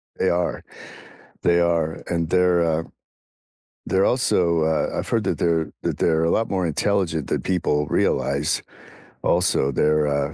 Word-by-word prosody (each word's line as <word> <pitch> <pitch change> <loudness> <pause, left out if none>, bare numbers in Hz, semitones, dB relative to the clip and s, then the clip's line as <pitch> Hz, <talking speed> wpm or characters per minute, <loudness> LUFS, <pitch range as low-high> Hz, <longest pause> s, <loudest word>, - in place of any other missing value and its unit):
They 95 - +1
are, 90 0 -1 0.8
they 85 0 +3
are, 85 -2 0
and 85 -2 -2
they're, 90 -1 +3
uh 80 0 0 1.0
they're 95 +1 +2
also, 85 -10 +2
uh 80 0 0
I've - - -4
heard 115 -3 0
that - - -1
they're 80 -2 0
that - - -2
they're 80 -1 +2
a 85 - +1
lot 115 - +1
more 95 -2 -1
intelligent 85 -2 -1
than - - -1
people 80 -5 0
realize. 70 +3 0 0.6
Also, 70 - +2
they're, 75 +2 +2
uh 70 +1 -1
85 Hz, 150 wpm, -22 LUFS, 80-90 Hz, 1.0 s, they